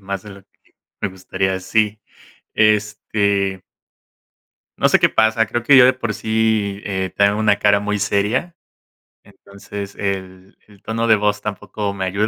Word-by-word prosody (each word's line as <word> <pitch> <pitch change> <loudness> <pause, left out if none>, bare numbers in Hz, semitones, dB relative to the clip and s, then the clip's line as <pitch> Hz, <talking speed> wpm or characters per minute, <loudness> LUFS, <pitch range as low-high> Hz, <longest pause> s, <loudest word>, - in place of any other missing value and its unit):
más 100 -1 -5
de 105 - -10
lo 100 0 -13
que - - -37 0.3
me - - -1
gustaría, 95 0 -3
sí. 105 +2 0 0.5
Este 105 -2 +1 1.2
no - - +3
sé - - +5
qué - - +4
pasa, 110 0 +2
creo 120 +1 -3
que 140 - +4
yo 130 -2 +8
de 130 - +4
por 120 -4 -3
sí, 110 -3 -1
eh, 95 -2 -3
tengo 100 +1 +3
una 105 -2 +2
cara 100 0 +3
muy 105 0 -2
seria, 105 - -1 0.7
entonces. 100 0 -10
El 95 -1 -5
el 100 -2 -20
tono 115 +1 -2
de 110 -1 +5
voz 105 0 0
tampoco 105 0 -4
me 95 -1 -3
ayuda, 100 +3 0
105 Hz, 160 wpm, -19 LUFS, 100-110 Hz, 1.2 s, yo